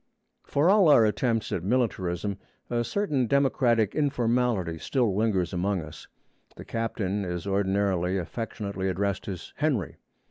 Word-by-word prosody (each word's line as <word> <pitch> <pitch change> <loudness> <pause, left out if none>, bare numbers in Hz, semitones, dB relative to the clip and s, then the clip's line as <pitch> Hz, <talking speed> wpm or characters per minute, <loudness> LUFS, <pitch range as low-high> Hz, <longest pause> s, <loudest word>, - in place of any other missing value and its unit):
For 145 +4 +1
all 195 -2 +6
our 120 -6 +7
attempts 115 +1 0
at 85 - -2
militarism, 100 -4 -1 0.3
a 120 0 +1
certain 145 - 0
democratic 120 -5 +2
informality 120 - 0
still 120 - 0
lingers 100 -4 0
among 95 0 0
us. 75 0 -11 0.5
The - - -10
captain 105 -3 -2
is 90 -1 -4
ordinarily 95 -2 +1
affectionately 100 0 -4
addressed 100 +1 -2
as 95 -4 -7
'Henry.' 135 - -1
105 Hz, 130 wpm, -27 LUFS, 95-125 Hz, 0.5 s, our